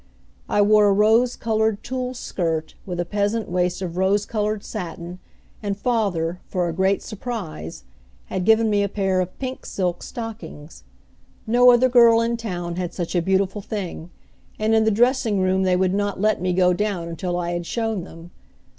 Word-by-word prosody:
I 205 Hz, -, +3 dB
wore 210 Hz, 0 st, +5 dB
a -, -, +4 dB
rose 220 Hz, +5 st, +3 dB
colored 220 Hz, -2 st, 0 dB
tulle 255 Hz, 0 st, -4 dB
skirt 165 Hz, -8 st, -3 dB
with 175 Hz, -2 st, -4 dB
a 175 Hz, -, 0 dB
peasant 205 Hz, +4 st, -1 dB
waist 180 Hz, +1 st, 0 dB
of 175 Hz, -1 st, -5 dB
rose 195 Hz, +2 st, +2 dB
colored 210 Hz, -1 st, -2 dB
satin, 175 Hz, -3 st, -6 dB, 0.4 s
and 200 Hz, -2 st, -3 dB
father, 190 Hz, -7 st, -1 dB
for 180 Hz, -2 st, -1 dB
a 170 Hz, -, -2 dB
great 190 Hz, +3 st, +1 dB
surprise, 190 Hz, -, -6 dB, 0.4 s
had 185 Hz, -, -3 dB
given 220 Hz, +3 st, +4 dB
me 205 Hz, -1 st, +2 dB
a 200 Hz, -, 0 dB
pair 195 Hz, -2 st, 0 dB
of 185 Hz, 0 st, -5 dB
pink 260 Hz, -1 st, -5 dB
silk 180 Hz, -2 st, -2 dB
stockings. 225 Hz, -10 st, -8 dB, 0.6 s
No 245 Hz, +2 st, +5 dB
other 245 Hz, +1 st, +6 dB
girl 235 Hz, -2 st, +6 dB
in 230 Hz, +1 st, 0 dB
town 175 Hz, -7 st, -4 dB
had 180 Hz, -1 st, -4 dB
such 175 Hz, -3 st, -3 dB
a 175 Hz, -, +2 dB
beautiful 190 Hz, +3 st, 0 dB
thing, 185 Hz, -5 st, -5 dB, 0.5 s
and 215 Hz, +1 st, +1 dB
in 220 Hz, 0 st, +4 dB
the -, -, +4 dB
dressing 230 Hz, -1 st, +2 dB
room 185 Hz, 0 st, +2 dB
they 185 Hz, -1 st, +2 dB
would 185 Hz, 0 st, +1 dB
not 205 Hz, -1 st, -1 dB
let 215 Hz, -1 st, +1 dB
me 185 Hz, 0 st, 0 dB
go 180 Hz, 0 st, +3 dB
down 195 Hz, -3 st, -2 dB
until 175 Hz, +1 st, -3 dB
I 175 Hz, -1 st, -2 dB
had 175 Hz, -1 st, -3 dB
shown 225 Hz, -5 st, -2 dB
them. 165 Hz, 0 st, -12 dB
200 Hz, 180 wpm, -22 LUFS, 180-220 Hz, 0.6 s, other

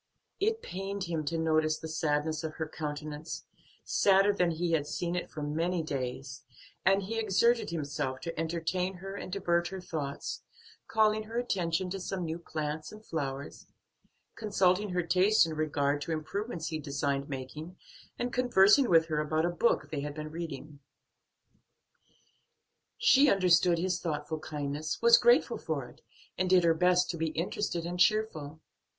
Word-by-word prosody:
It 445 Hz, +3 st, 0 dB
pained 195 Hz, +1 st, -4 dB
him 165 Hz, -3 st, -2 dB
to 165 Hz, +3 st, -1 dB
notice 155 Hz, -1 st, +2 dB
the 160 Hz, -, -7 dB
sadness 155 Hz, 0 st, -1 dB
of 155 Hz, -1 st, -4 dB
her 160 Hz, -, -3 dB
countenance, 150 Hz, 0 st, -6 dB, 0.4 s
sadder 195 Hz, +1 st, +4 dB
than 180 Hz, -3 st, +2 dB
he 170 Hz, +1 st, -1 dB
had 150 Hz, -3 st, +1 dB
seen 175 Hz, +3 st, -2 dB
it 180 Hz, -, -3 dB
for 150 Hz, -, -6 dB
many 165 Hz, +4 st, -1 dB
days, 135 Hz, -2 st, -4 dB, 0.4 s
and 195 Hz, +1 st, +3 dB
he 225 Hz, +4 st, -3 dB
exerted 230 Hz, +3 st, +2 dB
himself 145 Hz, -4 st, -3 dB
to 165 Hz, -1 st, -5 dB
entertain 170 Hz, +3 st, -1 dB
her 195 Hz, +2 st, -7 dB
and 185 Hz, -, -7 dB
divert 175 Hz, -3 st, +1 dB
her 190 Hz, +1 st, -6 dB
thoughts, 155 Hz, -6 st, -5 dB, 0.5 s
calling 215 Hz, 0 st, +2 dB
her 225 Hz, +2 st, -6 dB
attention 180 Hz, -6 st, -1 dB
to 195 Hz, -, -3 dB
some 185 Hz, -1 st, -3 dB
new 160 Hz, +1 st, -4 dB
plants 155 Hz, -2 st, -4 dB
and 215 Hz, +1 st, -13 dB
flowers, 140 Hz, -3 st, -5 dB, 0.7 s
consulting 205 Hz, -2 st, +1 dB
her 180 Hz, -1 st, 0 dB
taste 185 Hz, +4 st, +4 dB
in 160 Hz, -, -4 dB
regard 145 Hz, -2 st, 0 dB
to 165 Hz, -, -4 dB
improvements 165 Hz, +3 st, -3 dB
he 155 Hz, -1 st, -3 dB
designed 140 Hz, -1 st, -2 dB
making, 150 Hz, +6 st, -7 dB, 0.4 s
and 245 Hz, 0 st, -3 dB
conversing 245 Hz, 0 st, +5 dB
with 165 Hz, -2 st, +5 dB
her 155 Hz, -2 st, -1 dB
about 155 Hz, +2 st, 0 dB
a -, -, +1 dB
book 175 Hz, +7 st, +1 dB
they 150 Hz, -, -2 dB
had 145 Hz, 0 st, -5 dB
been 155 Hz, 0 st, -6 dB
reading. 155 Hz, -3 st, -7 dB, 2.2 s
She 275 Hz, +1 st, +5 dB
understood 180 Hz, -3 st, +4 dB
his 180 Hz, +1 st, 0 dB
thoughtful 155 Hz, -1 st, -3 dB
kindness, 150 Hz, 0 st, -4 dB
was 470 Hz, +1 st, +7 dB
grateful 480 Hz, 0 st, +4 dB
for -, -, -3 dB
it, -, -, -18 dB, 0.4 s
and 185 Hz, 0 st, +1 dB
did 185 Hz, -1 st, +5 dB
her 165 Hz, -1 st, +5 dB
best 180 Hz, +2 st, +3 dB
to 170 Hz, -, -6 dB
be 160 Hz, 0 st, 0 dB
interested 170 Hz, +2 st, -2 dB
and 175 Hz, +1 st, -4 dB
cheerful. 160 Hz, -8 st, +1 dB
165 Hz, 160 wpm, -30 LUFS, 155-190 Hz, 2.2 s, was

